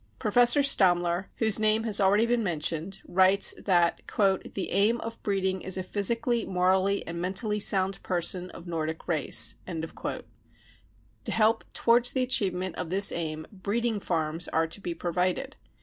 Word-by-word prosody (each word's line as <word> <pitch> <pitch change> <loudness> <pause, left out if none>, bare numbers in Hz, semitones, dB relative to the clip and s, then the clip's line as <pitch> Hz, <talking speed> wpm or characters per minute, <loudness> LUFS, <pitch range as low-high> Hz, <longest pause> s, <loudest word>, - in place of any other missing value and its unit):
Professor 245 +5 +4
Stammler, 175 -7 +2
whose 220 -2 +1
name 215 +1 +2
has 215 -3 +1
already 200 +3 +3
been 240 0 0
mentioned, 170 0 -2
writes 190 +2 +4
that 175 -3 +1
44 195 -4 0
The 190 - -4
aim 220 +4 +2
of 230 0 -8
breeding 190 -2 -2
i& - - -10
a 185 0 -1
physically, 230 +4 -1
morally 190 +2 0
and 170 +1 -6
mentally 210 +4 -1
sound 195 -1 +1
person 180 0 -1
of 170 - -12
Nordic 160 -2 -5
race. 160 -4 +2
5 165 -3 -6 0.7
' - - -33
To - - +1
help 225 +1 +2
towards 240 +1 +3
the 260 - 0
achievement 185 -8 -1
of 180 - -5
this 195 +3 +3
aim 155 -2 -4
" - - -34
breeding 215 +3 -2
farms 165 -2 -1
55 - - -2
are 165 - +1
to 185 +5 -8
be 175 -3 -5
provided. 185 - -2
190 Hz, 165 wpm, -27 LUFS, 175-215 Hz, 0.7 s, Professor